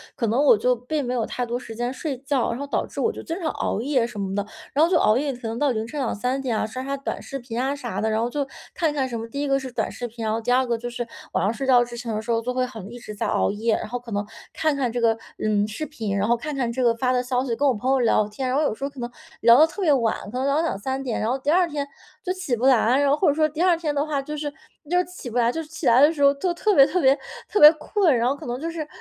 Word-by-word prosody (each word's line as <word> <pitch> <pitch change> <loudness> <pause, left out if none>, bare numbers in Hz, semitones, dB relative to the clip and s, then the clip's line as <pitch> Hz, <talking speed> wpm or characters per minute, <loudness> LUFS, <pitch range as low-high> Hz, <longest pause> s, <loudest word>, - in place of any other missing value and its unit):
可 230 - -1
能 235 +6 +2
我 275 -7 +6
就 250 +3 +2
并 250 +5 -3
没 250 -1 -2
有 235 -3 0
太 250 - -3
多 240 +1 -3
时 225 -3 -9
间 240 +2 -2
睡 275 0 -4
觉， 270 -3 0
然 235 - -3
后 280 - -3
导 - - -1
致 - - -6
我 455 - +2
就 - - -8
经 330 0 -4
常 320 - 0
熬 215 - -2
夜 255 -3 +1
什 225 - -10
么 195 -1 -3
的， 205 0 -1 0.3
然 305 +4 +5
后 - - -1
就 360 - +4
熬 215 -7 +4
夜 280 +1 -1
可 245 -1 -10
能 225 +1 -4
到 290 -3 +2
凌 220 -1 -2
晨 290 +6 -6
2-3 255 +1 -1
点 245 -5 -1
啊， - - 0
刷 220 +4 -6
刷 275 - -2
短 275 - -5
视 275 - -6
频 240 -1 -4
啊 270 +2 0
啥 250 -5 -5
的。 220 - 0
然 220 0 0
后 235 - 0
就 280 +2 -2 0.3
看 320 -4 0
看 270 -3 0
什 235 -2 -4
么 225 - -6
第 280 +5 -5
一 290 - -1
个 275 0 +2
是 265 -1 -6
短 - - -1
视 245 - -5
频， 230 0 -8
然 215 0 0
后 225 - 0
第 245 +2 0
二 260 +1 +3
个 235 -2 -1
就 240 +1 -5
是 240 0 -4 0.3
晚 - - +1
上 205 +4 +1
睡 270 +2 -4
觉 250 -2 +6
之 240 0 -8
前 230 -2 -4
的 215 - -2
时 235 - -4
候 230 0 +1
就 250 +2 -3
会 255 0 +1
很 220 -6 -9
一 240 - -9
直 235 -3 -9
在 210 - -2
熬 - - +1
夜。 220 +2 0
然 - - -5
后 245 +2 -3
可 240 -1 -12
能 205 +1 -1 0.3
看 310 -1 +1
看 270 -3 0
这 240 +1 -3
个， 225 -1 +3 0.2
嗯， 210 -1 +1
视 220 +9 -5
频， 220 -10 -3
然 200 - +1
后 235 - +3
看 300 +5 -5
看 245 -4 -1
这 255 +2 -2
个 235 -2 +3
发 250 +2 0
的 250 -1 +2
消 250 0 -1
息， 250 -3 -2
跟 285 +4 +2
我 265 - +4
朋 245 +4 -1
友 270 - +3
聊 225 -3 +3
天， 255 +5 -4
然 255 - 0
后 305 - +2
有 290 - +1
时 245 - -9
候 280 - -1
可 280 -2 -13
能 240 0 -4 0.3
聊 235 +2 +7
得 315 - +7
特 325 +6 -7
别 335 -5 +3
晚， 230 -4 +2 0.2
可 250 - -4
能 260 - -1
聊 280 +1 +2
到 320 - +3
2-3 265 -2 -2
点， 250 -4 -2
然 220 - 0
后 260 - 0
第 270 +2 -3
2 355 +1 +4
天 290 -3 -3 0.4
就 365 - -2
起 365 -10 -2
不 235 +2 -2
来， 255 0 +4
然 285 -1 +3
后 285 - +4
或 370 - +2
者 285 - +5
说 310 +1 +2
第 305 +3 -4
2 360 -1 +5
天 310 -3 -2
的 285 +1 0
话 295 -3 -1
就 300 +2 -6
是 295 -1 -3 0.4
就 360 +1 +3
起 360 -8 -9
不 230 - -4
来， 235 -1 +3
就 325 - -3
是 310 - -10
起 320 -1 -7
来 240 +2 +6
的 295 +3 +7
时 285 -3 -1
候 280 0 +6
就 345 +5 -1
特 415 +4 +1
别 275 - +8
特 360 +5 0
别 270 0 +5 0.3
特 420 - +1
别 300 +1 +11
困。 320 - +1
然 235 0 +1
后 275 - 0
可 - - -11
能 245 +1 -3
就 330 - -2
是 320 -3 -5
255 Hz, 355 characters per minute, -24 LUFS, 235-290 Hz, 0.4 s, 别